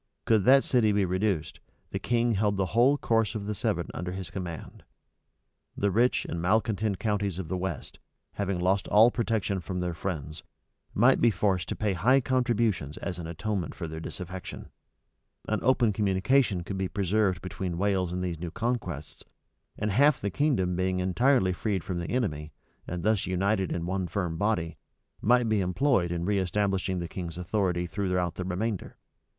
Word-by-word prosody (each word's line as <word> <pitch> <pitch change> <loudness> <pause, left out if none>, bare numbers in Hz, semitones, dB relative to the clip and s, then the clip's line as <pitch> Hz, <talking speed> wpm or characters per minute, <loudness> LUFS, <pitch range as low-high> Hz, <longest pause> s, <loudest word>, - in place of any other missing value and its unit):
Could 110 -4 +3
that 135 +1 +7
city 115 -4 +3
be 100 -1 +2
reduced, 90 -4 -1 0.3
the - - -2
king 120 -1 +1
held 100 0 +1
the 95 - +1
whole 125 +5 +5
course 115 -4 +1
of 105 -2 -4
the 105 - -2
Severn 100 - -1
under 90 +2 -4
his 95 -2 -6
command; 90 -5 -7 1.0
the 100 0 +1
rich 120 +6 +2
and 85 - -4
malecontent 105 +1 +1
counties 100 -3 -1
of 90 -4 -5
the 95 - -1
west, 90 -5 -5 0.3
having 100 -3 -2
lost 95 +2 +1
all 110 +3 +6
protection 110 -5 -1
from 90 +1 -4
their 90 -1 -2
friends, 80 -3 -5 0.5
might 125 +5 +4
be 120 - +6
forced 95 -4 0
to - - -2
pay 105 -2 0
high 125 +10 +4
contributions 115 - 0
as 90 -3 -5
an 85 - -5
atonement 95 +2 -3
for 85 - -5
their 80 0 -6
disaffection; 90 +2 -7 0.8
an 110 - 0
open 120 -4 +3
communication 100 +1 +2
could 95 +2 -5
be 95 - 0
preserved 95 -1 +1
between 90 -2 -4
Wales 95 -2 +1
and 90 0 -2
these 85 -3 -3
new 85 0 -4
conquests; 90 - -4 0.5
and 105 0 -1
half 140 +8 +5
of - - -22
the 100 - -2
kingdom 95 -9 +1
being 90 +1 0
entirely 95 +2 +2
freed 95 -1 -2
from 90 -2 -3
the 85 - -4
enemy, 80 - -2 0.4
and 85 -1 -4
thus 110 -1 +1
united 95 +1 0
into 85 -1 -2
one 95 0 -1
firm 90 -2 -2
body, 85 -4 -1 0.4
might 120 +1 +4
be 110 -2 +2
employed 95 0 +1
in 85 0 -2
reestablishing 95 -1 0
the 85 -1 -3
king's 85 -2 -6
authority 90 -1 0
throughout 90 -2 -1
the 90 - -4
remainder. 95 +3 -3
95 Hz, 175 wpm, -28 LUFS, 90-110 Hz, 1.0 s, that